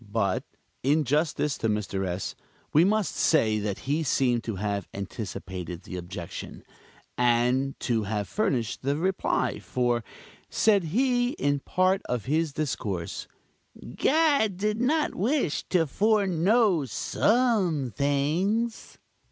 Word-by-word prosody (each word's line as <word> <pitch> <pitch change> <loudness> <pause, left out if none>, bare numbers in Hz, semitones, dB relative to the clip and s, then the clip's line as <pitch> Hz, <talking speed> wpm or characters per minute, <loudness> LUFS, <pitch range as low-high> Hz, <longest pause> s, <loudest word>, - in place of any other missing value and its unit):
But, 105 -3 0 0.4
in 150 +4 +2
justice 150 +1 0
to 115 - 0
Mr. 100 -2 -1
S., 90 +1 -3 0.4
we 155 - +6
must 210 +1 +1
say 110 -9 +3
that 100 -2 -3
he 145 +4 +1
seemed 125 -5 +1
to 110 - -3
have 100 0 -2
anticipated 95 -3 -6
the 90 - -8
objection, 85 -1 -7 0.6
and 125 +3 +2
to 115 -3 +1
have 105 0 -2
furnished 130 - -1
the 140 +2 0
reply; 185 +4 0
for, 120 -2 0 0.5
said 205 -5 +3
he, 245 - +1
in 145 0 0
one - - -6
part 185 +6 +1
of 125 -4 -2
his 155 +3 +1
discourse, 105 - -3 0.7
"God 280 - +3
did 210 +3 -1
not 300 +5 +1
wish 225 - 0
to 175 -3 +3
foreknow 195 - +2
some 185 - +1
things!" 175 +12 0
145 Hz, 125 wpm, -27 LUFS, -, 0.7 s, we